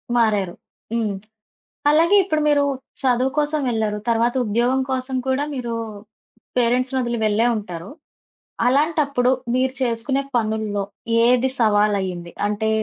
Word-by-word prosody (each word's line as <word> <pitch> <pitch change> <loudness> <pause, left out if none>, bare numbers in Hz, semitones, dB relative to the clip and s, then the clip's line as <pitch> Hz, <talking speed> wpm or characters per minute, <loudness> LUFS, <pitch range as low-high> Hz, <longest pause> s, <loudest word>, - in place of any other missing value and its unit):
మారారు. 210 -6 +2 0.4
హ్మ్. 220 -3 0 0.8
అలాగే 335 +6 +5
ఇప్పుడు 310 -5 0
మీరు 290 -1 +4 0.4
చదువు 255 -1 +2
కోసం 300 0 +1
వెళ్లారు. 215 -2 -1
తర్వాత 235 +1 +2
ఉద్యోగం 240 +5 +1
కోసం 260 0 -2
కూడా 265 +2 +1
మీరు 240 -3 -4 0.8
పేరెంట్స్‌ని 250 +2 +1
ఒదిలి 240 -2 -2
వెళ్ళే 215 +2 +2
ఉంటారు. 180 -3 -6 0.8
అలాంటప్పుడు 280 -2 +2 0.2
మీరు 260 0 +1
చేసుకునే 250 +3 0
పనుల్లో, 215 -2 -1 0.4
ఏది 250 +2 +4
సవాలయ్యింది? 200 -5 +1
అంటే 210 +1 -1
240 Hz, 110 wpm, -21 LUFS, 215-265 Hz, 0.8 s, అలాగే